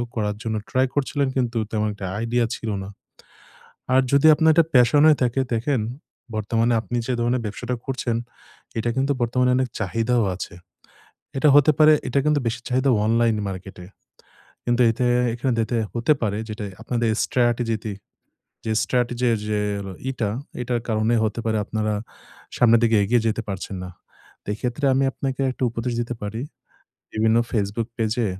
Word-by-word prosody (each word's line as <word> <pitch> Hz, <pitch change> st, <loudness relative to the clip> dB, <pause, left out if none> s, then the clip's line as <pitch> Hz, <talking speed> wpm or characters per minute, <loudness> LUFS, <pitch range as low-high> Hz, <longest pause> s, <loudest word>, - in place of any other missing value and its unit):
করার 105 Hz, -2 st, -1 dB
জন্য 110 Hz, -2 st, -2 dB
ট্রাই 130 Hz, +1 st, +2 dB
করছিলেন 140 Hz, -1 st, 0 dB
কিন্তু 120 Hz, -2 st, 0 dB
তেমন 110 Hz, -1 st, 0 dB
একটা 100 Hz, -2 st, -6 dB
আইডিয়া 115 Hz, +1 st, +1 dB
ছিল 115 Hz, -, -6 dB, 0.2 s
না। -, -, -8 dB, 1.1 s
আর 130 Hz, -, +6 dB
যদি 140 Hz, +2 st, +5 dB
আপনার 160 Hz, +1 st, +4 dB
এটা 165 Hz, -1 st, +5 dB
প্যাশন 125 Hz, +3 st, +5 dB
হয়ে 155 Hz, -2 st, +6 dB
থাকে, 125 Hz, +2 st, 0 dB
দেখেন 120 Hz, +2 st, 0 dB, 0.6 s
বর্তমানে 115 Hz, +2 st, +1 dB
আপনি 120 Hz, +2 st, -4 dB
যে 130 Hz, -, -1 dB
ধরনের 120 Hz, +1 st, +1 dB
ব্যবসাটা 120 Hz, +4 st, -4 dB
করছেন, 125 Hz, -3 st, -1 dB, 0.6 s
এটা 120 Hz, +1 st, 0 dB
কিন্তু 135 Hz, +2 st, +2 dB
বর্তমানে 125 Hz, +2 st, +2 dB
অনেক 130 Hz, -1 st, +1 dB
চাহিদাও 115 Hz, +3 st, +1 dB
আছে। 90 Hz, 0 st, -7 dB, 0.8 s
এটা 150 Hz, -, +3 dB
হতে 145 Hz, +1 st, +7 dB
পারে, 155 Hz, 0 st, +8 dB
এটা 135 Hz, +3 st, +1 dB
কিন্তু 150 Hz, -1 st, +3 dB
বেশি 120 Hz, +1 st, -2 dB
চাহিদা 130 Hz, +1 st, +1 dB, 0.2 s
অনলাইন 115 Hz, 0 st, +3 dB
মার্কেট 95 Hz, 0 st, -7 dB
এ। -, -, -13 dB, 0.8 s
কিন্তু 120 Hz, +1 st, +2 dB
এতে 125 Hz, +2 st, -1 dB, 0.3 s
এখান 125 Hz, +2 st, -1 dB
দেতে 115 Hz, +1 st, 0 dB, 0.2 s
হতে 120 Hz, +6 st, +3 dB
পারে 105 Hz, -2 st, 0 dB
যেটা 105 Hz, 0 st, -5 dB, 0.2 s
আপনাদের 120 Hz, -2 st, -1 dB, 0.2 s
strategy 115 Hz, -3 st, 0 dB, 0.7 s
যে 110 Hz, -, -1 dB
strategy 125 Hz, 0 st, 0 dB, 0.2 s
যে 105 Hz, -1 st, 0 dB, 0.5 s
ইটা 115 Hz, -6 st, -2 dB, 0.3 s
এটার 120 Hz, -1 st, -1 dB
কারণে 110 Hz, +1 st, +1 dB
হতে 110 Hz, +2 st, -2 dB
পারে 110 Hz, -1 st, +1 dB
আপনারা 110 Hz, 0 st, -1 dB, 0.6 s
সামনের 115 Hz, -1 st, +5 dB
দিকে 115 Hz, -1 st, +3 dB
এগিয়ে 120 Hz, +2 st, +2 dB
যেতে 115 Hz, +1 st, 0 dB
পারছেন 95 Hz, 0 st, -5 dB
না। 90 Hz, -, -7 dB, 0.5 s
তে -, -, -19 dB
এক্ষেত্রে 125 Hz, +5 st, -3 dB
আমি 135 Hz, +1 st, +2 dB
আপনাকে 135 Hz, -1 st, -3 dB
একটা 130 Hz, -, -7 dB
উপদেশ 115 Hz, +1 st, -3 dB
দিতে 120 Hz, +1 st, -3 dB
পারি। 105 Hz, +3 st, -4 dB, 0.7 s
বিভিন্ন 110 Hz, +1 st, +2 dB
Facebook 105 Hz, +1 st, -1 dB
পেজে, 115 Hz, +1 st, 0 dB
120 Hz, 160 wpm, -23 LUFS, 110-125 Hz, 1.1 s, পারে